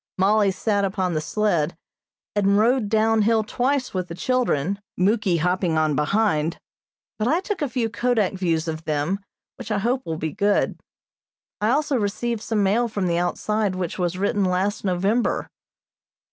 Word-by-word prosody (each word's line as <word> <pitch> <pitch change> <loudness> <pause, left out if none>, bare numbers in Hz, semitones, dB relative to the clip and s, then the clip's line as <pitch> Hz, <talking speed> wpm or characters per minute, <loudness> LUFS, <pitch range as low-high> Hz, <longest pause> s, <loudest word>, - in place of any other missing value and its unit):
Mollie 200 +2 +3
sat 200 +2 0
upon 190 -2 -1
the 155 - 0
sled, 170 -4 0 0.6
and 200 -1 +3
rode 230 0 +2
down 220 0 +3
hill 220 +1 +3
twice 255 +5 -1
with 185 -1 -2
the 170 - -7
children, 200 - 0 0.2
Muky 195 -1 +2
hopping 180 0 +1
on 155 -2 +2
behind; 160 0 +1 0.6
but 215 - +1
I 320 +7 +3
took 390 0 -4
a 290 - 0
few 245 -2 0
kodak 225 -3 0
views 170 -4 -1
of 160 0 -4
them, 155 +6 -1 0.4
which - - -8
I 210 - +1
hope 245 +6 0
will 160 -1 -4
be 160 0 -3
good. 205 0 +1 0.8
I 210 - +2
also 290 +1 +1
received 215 +2 -2
some 220 -2 0
mail 220 +5 +2
from 205 -4 -2
the 170 -1 +1
outside 205 +3 -1
which 185 0 -4
was 180 0 -1
written 200 +1 +1
last 190 +3 0
November. 195 +5 0
200 Hz, 165 wpm, -23 LUFS, 180-225 Hz, 0.8 s, Mollie